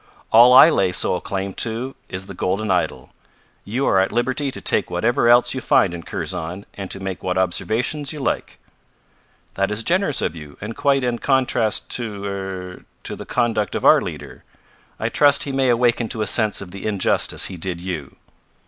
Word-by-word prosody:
"All 120 +2 +8
I 140 +6 +9
lay 95 -10 +1
sole - - +1
claim 95 0 -4
to 120 +4 -3 0.2
is 95 +1 -5
the 100 - -9
golden 95 +3 -2
idol. 85 -8 -2 0.5
You 125 +7 -2
are 95 - +3
at 95 - +1
liberty 130 +4 -1
to - - -7
take - - -1
whatever 120 0 +1
else 120 0 +5
you 130 - -4
find 90 - +3
in 85 - -6
Kurzon 85 +4 -5
and 95 -2 -7
to 95 - -4
make 95 -2 -5
what 90 0 -2
observations 115 - 0
you 150 - -7
like." 135 - -3 1.0
"That 100 +1 -1
is 105 +2 -1
generous 175 - +1
of - - -2
you, 75 -3 -11
and 110 +2 -6
quite 140 -2 +1
in 120 -1 -1
contrast 130 -5 +1
to 105 -5 -6
er 95 -2 -6 0.2
to - - -6
the - - -10
conduct 115 -4 0
of - - -2
our - - +7
leader. - - -8 0.6
I - - -1
trust 145 -1 +4
he 140 - -4
may 135 -1 +1
awaken 120 -1 +2
to 110 - -2
a - - -2
sense 110 0 +1
of 95 -2 -9
the 100 +2 -6
injustice 100 -3 +1
he 95 - -4
did 85 0 -4
you." 85 -6 -6
110 Hz, 195 wpm, -21 LUFS, 95-125 Hz, 1.0 s, I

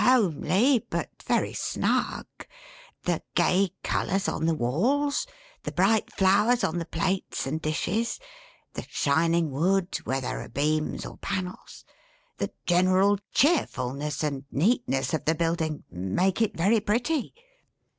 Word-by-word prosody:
"Homely, 220 - +3
but - - -3
very - - 0
snug. - - -1 0.8
The - - 0
gay 190 +1 +3
colors 195 +1 0
on 160 - -1
the 165 - +2
walls; 260 - +1 0.3
the - - -5
bright 200 +4 +2
flowers 210 +6 +3
on 175 +2 0
the 165 - -5
plates 185 +4 -2
and 155 +4 -3
dishes; 180 - -1 0.5
the - - -5
shining 165 +2 +1
wood, 185 +6 +1
where 135 +1 -1
there 125 - -3
are - - -9
beams 150 +4 -1
or - - -9
panels; 185 -2 -5 0.5
the - - -2
general 185 +3 +3
cheerfulness 150 - +1
and 140 -3 -2
neatness 170 - +1
of 155 - -1
the 160 - +2
building; 165 -2 -1
make 95 - 0
it 220 - 0
very 200 +7 +3
pretty." 240 - -1
180 Hz, 130 wpm, -27 LUFS, 155-210 Hz, 0.8 s, Homely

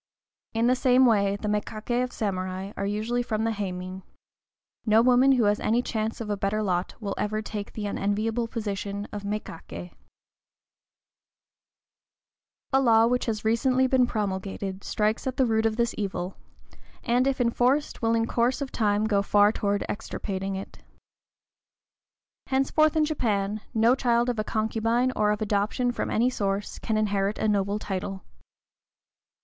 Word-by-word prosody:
In 225 +1 +2
the 250 +1 +4
same 255 0 +4
way 200 -4 +3
the 205 +1 -5
mékaké 215 +3 -1
of 250 - -4
samurai 185 -1 -3
are 200 - -2
usually 220 +4 -1
from 220 -2 -2
the 225 - +1
héimin. 185 -2 -5 0.8
No 220 0 +4
woman 255 +2 +5
who 250 -3 +3
has 205 0 +2
any 235 +3 +1
chance 220 -2 -2
of 230 - -5
a 205 - -1
better 200 +2 -1
lot 180 -2 -1
will 200 -3 -3
ever 215 +1 -1
take 210 -1 -5
the 215 - -4
unenviable 215 +4 -1
position 205 -2 -4
of 205 - -5
mékaké. 200 -4 -6 2.8
A 270 - +5
law 225 -3 +5
which 250 +1 0
has 215 -1 -2
recently 255 +4 +3
been 255 -1 +3
promulgated 195 -2 -3
strikes 215 +4 -1
at 260 - -3
the 265 - +4
root 220 -1 +2
of 220 - -2
this 235 0 0
evil, 190 -2 -3 0.7
and, 245 +2 +2
if 270 -1 0
enforced, 250 +4 +1
will 230 0 +2
in 225 0 +2
course 235 +2 +1
of 280 -2 -4
time 210 -1 +1
go 205 -2 +2
far 205 +1 +4
toward 205 -2 -1
extirpating 195 -2 -4
it. 190 - -8 1.7
Henceforth 285 +4 +2
in 310 -1 +3
Japan, 215 -8 -1
no 225 +2 +5
child 240 -2 +2
of 240 -3 -2
a - - +1
concubine, 225 +3 0
or 210 0 +2
of 210 +1 0
adoption 210 +4 0
from - - -3
any 240 +3 +2
source, 200 -3 -2
can 220 - -1
inherit 205 -1 0
a - - 0
noble 200 -1 +1
title. 195 -2 -4
215 Hz, 155 wpm, -26 LUFS, 200-240 Hz, 2.8 s, woman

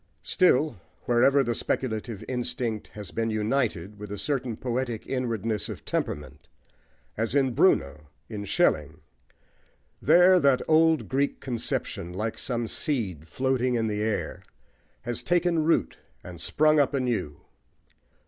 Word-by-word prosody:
Still, 155 - +3 0.3
wherever 135 +4 +4
the 120 -2 -1
speculative 110 -3 -2
instinct 120 -3 -2
has 105 -4 -9
been 115 0 -1
united 105 -3 -1
with 105 -1 -8
a 105 - -4
certain 125 -2 -2
poetic 120 -2 -3
inwardness 115 -4 -2
of - - -8
temperament, 75 0 -4 0.7
as 115 +4 -1
in 135 -3 +2
Bruno, 75 - +2 0.2
in 105 -2 -6
Schelling, 75 -4 +1 1.0
there 180 +1 +6
that 140 -5 +3
old 160 0 +4
Greek 140 +2 0
conception, 115 -7 -3
like 110 +4 -3
some 120 -2 -1
seed 105 - -2
floating 130 - 0
in 115 -1 +1
the 105 -1 -2
air, 110 -1 -2 0.6
has 120 0 -3
taken 175 -2 +1
root 165 - +1 0.2
and 85 -2 -10
sprung 155 - +3
up 140 0 +2
anew. 120 - -2
120 Hz, 130 wpm, -26 LUFS, 105-135 Hz, 1.0 s, there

